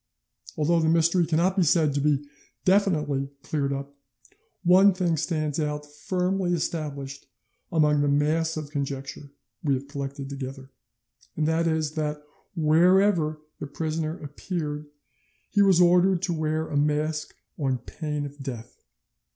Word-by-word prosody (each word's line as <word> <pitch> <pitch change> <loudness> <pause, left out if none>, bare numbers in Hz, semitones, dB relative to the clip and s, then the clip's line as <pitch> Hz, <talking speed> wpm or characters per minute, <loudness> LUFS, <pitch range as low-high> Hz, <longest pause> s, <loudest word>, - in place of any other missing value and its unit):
Although 165 +3 +2
the 160 -1 +2
mystery 165 +1 +3
cannot 175 +4 +2
be 195 - +2
said 160 -3 +3
to 140 - 0
be 145 -1 +1 0.4
definitely 155 -8 +2
cleared 140 -3 -1
up, 140 +1 -5 0.7
one 190 +2 +6
thing 175 -3 +1
stands 155 -1 -1
out 150 -1 -2
firmly 180 +4 -1
established 145 -4 -4 0.4
among 150 -3 +3
the 145 - +2
mass 155 +3 +1
of 150 -2 -6
conjecture 140 0 -5 0.3
we 140 -3 +2
have 135 +2 -6
collected 140 -1 -5
together, 135 -1 -7 0.7
and 155 0 +1
that 165 +1 +1
is, 160 -2 0
that 150 -1 -2 0.4
wherever 165 0 +3 0.2
the - - -5
prisoner 155 +2 -3
appeared 150 0 -4 0.6
he 205 - +3
was 190 -3 +5
ordered 180 +1 +4
to 175 - 0
wear 155 0 -1
a - - -5
mask 150 +1 0 0.2
on 135 -3 0
pain 150 +4 -4
of 145 0 -9
death. 120 -3 -8
155 Hz, 140 wpm, -26 LUFS, 145-170 Hz, 0.7 s, one